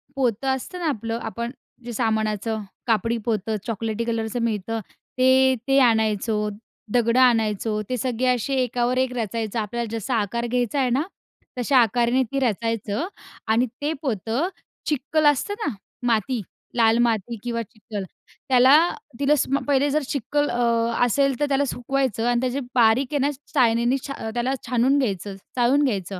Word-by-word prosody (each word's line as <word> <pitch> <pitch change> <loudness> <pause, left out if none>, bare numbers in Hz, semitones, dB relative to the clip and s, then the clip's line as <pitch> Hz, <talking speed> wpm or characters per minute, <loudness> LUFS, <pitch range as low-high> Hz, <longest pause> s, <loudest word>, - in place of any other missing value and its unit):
पोतं 250 -1 0
असतं 360 +8 -7
ना 335 - -1
आपलं, 230 -4 -2
आपण 235 +2 -4 0.3
जे 240 - -5
सामानाचं, 220 -1 -1 0.3
कापडी 230 +1 +1
पोतं 220 -1 -1
चॉकलेटी 225 0 -2
कलरचं 225 0 -2
मिळतं, 225 0 -1 0.4
ते, 260 0 +5
ते 270 0 +4
आणायचो. 220 -3 +2 0.4
दगडं 235 0 +3
आणायचो, 220 -3 +2
ते 255 - -1
सगळे 250 +1 -1
असे 265 +3 -2
एकावर 245 +1 0
एक 260 -1 +1
रचायचं 225 0 -2
आपल्याला 230 +1 -3
जसा 230 +3 -2
आकार 235 +4 -2
घ्यायचा 245 +3 0
आहे 255 -2 +2
ना, 260 +4 +2 0.6
तशा 260 +2 +2
आकाराने 240 +2 +3
ते 275 - 0
रचायचं 230 - -1 0.4
आणि 225 +3 +3 0.2
ते 295 - 0
पोतं 235 - -1 0.4
चिखल 305 +2 0
असतं 295 +7 +3
ना, 280 - -1 0.3
माती, 230 +1 +1 0.3
लाल 225 -1 +4
माती 230 -1 0
किंवा 235 -1 -2
चिखल, 215 -1 -7 0.5
त्याला 260 +2 +7 0.4
तिला 285 +1 +4
स - - +1 0.2
पहिले 285 0 +3
जर 300 +1 +1
चिखल 290 +2 0
अ, 240 - -2 0.5
असेल, 275 +2 +1
तर 295 - +2
त्याला 280 +1 +2
सुकवायचं 245 -2 -1
आणि 240 0 +2
त्याचे 255 +2 -1 0.2
बारीक 240 +2 +4
आहे 290 - +1
ना - - 0 0.2
चाळनीनी 240 -1 +3
छा 250 -5 -5
त्याला 245 +2 0
छानून 250 +3 +3
घ्यायचं, 200 -5 -2 0.2
चाळून 255 +4 +3
घ्यायचं. 195 -7 -2
240 Hz, 155 wpm, -23 LUFS, 225-260 Hz, 0.6 s, त्याला